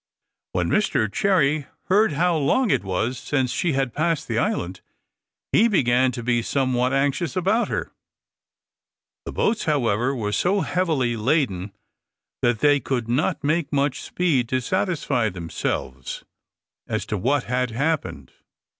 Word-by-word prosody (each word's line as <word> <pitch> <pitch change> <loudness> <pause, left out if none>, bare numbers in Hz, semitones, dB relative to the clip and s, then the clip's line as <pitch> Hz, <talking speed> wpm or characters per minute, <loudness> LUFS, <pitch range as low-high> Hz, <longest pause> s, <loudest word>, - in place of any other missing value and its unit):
When - - 0
Mr 130 - +1
Cherry 155 -7 +2 0.2
heard 205 -1 +3
how 170 +4 +2
long 195 - +2
it - - +1
was 105 +7 -2
since 130 -4 -1
she 170 -4 0
had 135 -3 -1
passed 160 0 0
the 115 -1 0
island, 90 -5 -2 0.7
he 225 - +5
began 130 - +3
to 120 - -5
be 120 0 +1
somewhat 130 0 0
anxious 140 +6 0
about 195 +6 +2
her. - - -3 1.3
The - - -5
boats, 220 0 0
however, 130 -3 +1
were 105 -4 -2
so 180 - +1
heavily 155 -12 0
laden, 110 - 0 0.7
that 120 -2 +1
they 145 -1 +5
could 120 -2 -2
not 130 +6 0
make 155 +1 0
much 140 -1 0
speed 140 -10 0
to 130 - +1
satisfy 150 - 0
themselves 80 -7 -4 0.6
as 110 -1 -2
to 110 - -3
what 135 +9 +1
had 125 +1 -1
happened. 115 - -2
135 Hz, 140 wpm, -23 LUFS, 120-160 Hz, 1.3 s, he